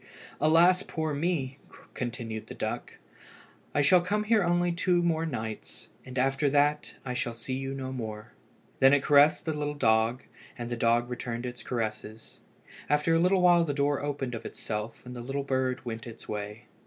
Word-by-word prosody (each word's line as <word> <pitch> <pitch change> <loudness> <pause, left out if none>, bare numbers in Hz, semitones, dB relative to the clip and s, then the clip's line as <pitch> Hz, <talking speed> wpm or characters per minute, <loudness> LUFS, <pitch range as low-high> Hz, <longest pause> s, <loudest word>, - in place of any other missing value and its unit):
"Alas, 170 +4 +5
poor 160 -5 -3
me!" 145 -4 -1 0.3
continued 115 -3 -5
the - - -8
duck, - - -4 0.8
"I 145 - +4
shall 180 +5 +6
come 205 +4 0
here 215 0 +3
only 175 0 +2
on - - -4
two 175 0 +2
more 165 -1 +1
nights. 110 -6 -6 0.3
After 135 +2 +2
that 145 +1 +1
I 125 - -3
shall 120 -1 -2
see 130 +3 -5
you 135 +1 -3
no 130 -1 -5
more." 110 -4 -6 0.5
Then 135 +1 +7
it 140 - 0
caressed 145 +1 +5
the 160 - -1
little 150 0 -3
dog, 115 -1 +2 0.3
and 120 0 -5
the - - 0
dog 115 +1 +2
returned 120 0 -4
its 125 0 -6
caresses. 110 -2 -5 0.5
After 150 +3 +3
a 165 - +4
little 180 +2 +3
while 175 -1 +6
the 145 -4 -2
door 145 0 +1
opened 140 -3 -3
of 115 - -5
itself 105 +2 -5
and 125 0 -8
the 120 - -6
little 135 +3 -3
bird 130 -1 -1
went 115 -1 -5
its 115 - -11
way. 105 +2 -5
135 Hz, 180 wpm, -28 LUFS, 120-155 Hz, 0.8 s, Then